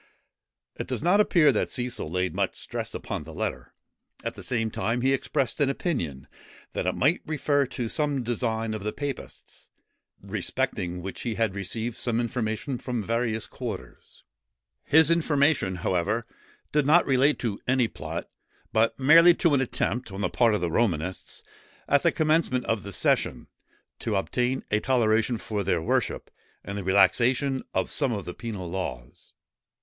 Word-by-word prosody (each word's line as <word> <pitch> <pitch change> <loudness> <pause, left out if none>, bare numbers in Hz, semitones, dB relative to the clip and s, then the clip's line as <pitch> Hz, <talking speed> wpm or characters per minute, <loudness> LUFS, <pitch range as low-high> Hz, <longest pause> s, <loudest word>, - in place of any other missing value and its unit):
It - - -4
does - - -3
not 180 +4 +4
appear 165 -8 +5
that 110 - 0
Cecil 120 -9 -2
laid 90 +2 -1
much - - -1
stress - - -5
upon - - -4
the 80 +1 -11
letter; - - -4 0.5
at - - -3
the - - -10
same 115 -3 -1
time 115 +3 -1
he 135 +2 +3
expressed 135 0 -1
an 140 - +4
opinion, 85 - -3 0.5
that - - -2
it - - +1
might 150 +6 +2
refer 145 -3 +1
to 120 -2 -4
some 145 0 0
design 115 -1 -1
of 110 -2 -5
the 105 - -2
papists, 145 -2 -7 0.5
respecting 90 0 -2
which 95 - -6
he 115 -3 -2
had 110 -4 0
received 110 +4 -3
some 120 -2 0
information 120 +1 -2
from 120 -4 -3
various 115 0 -1
quarters. 100 - -8 0.6
His 160 +2 +5
information, 145 - +2
however, 95 +6 0 0.5
did 150 -2 +2
not 170 +4 +6
relate 135 +2 +3
to 110 -5 -2
any 130 -2 +3
plot; - - -6 0.5
but 115 +3 +2
merely 165 +6 +7
to 170 -3 +2
an 135 - +3
attempt, 125 -2 -2
on 95 +1 -5
the - - +1
part 115 -3 +3
of - - -2
the 85 -2 -1
Romanists, 90 -4 -1 0.4
at 140 0 +4
the 170 - +3
commencement 155 -6 +1
of 115 -2 0
the 100 - -8
session, - - 0 0.5
to 110 - -2
obtain 125 +6 0
a 105 - +3
toleration 115 -1 +2
for 105 -2 -3
their 90 -2 +1
worship, 80 - -1 0.3
and 100 - -6
the 100 - -4
relaxation 125 +8 +3
of - - 0
some 140 -4 +1
of 100 -6 -3
the 90 - -5
penal 110 -6 -6
laws. 85 -10 -6
120 Hz, 165 wpm, -26 LUFS, 100-135 Hz, 0.6 s, merely